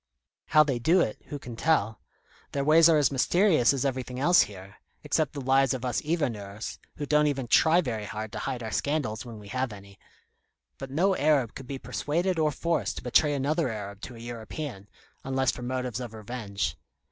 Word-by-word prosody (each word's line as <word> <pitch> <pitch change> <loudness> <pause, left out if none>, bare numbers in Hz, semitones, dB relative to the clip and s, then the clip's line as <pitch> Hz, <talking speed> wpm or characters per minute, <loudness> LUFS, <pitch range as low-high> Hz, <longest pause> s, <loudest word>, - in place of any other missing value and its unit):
How 155 - +6
they 135 -5 -1
do 165 +10 +4
it, 110 - -2
who 145 - -5
can 120 -4 -9
tell? 115 -6 +1 0.5
Their 140 - 0
ways 160 +3 +6
are 160 - +5
as 145 -1 +3
mysterious 155 - +3
as 140 -1 -1
everything 130 -2 -3
else 175 +6 +6
here, 95 -1 -6 0.3
except 155 -3 0
the 145 - -5
lives 135 0 +3
of 130 0 -5
us 125 -1 -1
hiverneurs, 115 -11 -3 0.2
who 145 - -4
don't 150 +1 +3
even 135 -3 -1
try 160 +7 +5
very 115 -8 -3
hard 110 +1 -5
to - - -5
hide 120 -2 -3
our 110 - -4
own - - -7
scandals 125 0 -1
when 115 -2 -9
we 105 -1 -12
have 130 0 -2
any. 100 -1 -13 0.8
But 135 - -6
no 185 +8 +2
Arab 140 -6 +2
could 135 - -9
be 135 - -4
persuaded 170 +6 -1
or 155 -1 +2
forced 165 +3 -1
to - - -6
betray 150 -1 +3
another 150 +2 0
Arab 100 -2 -6
to 120 - -8
a - - -11
European, 115 -1 -7 0.3
unless 130 -1 +1
for - - -9
motives 125 -1 -3
of 120 -3 -7
revenge. 110 -2 -4
130 Hz, 200 wpm, -27 LUFS, 110-150 Hz, 0.8 s, How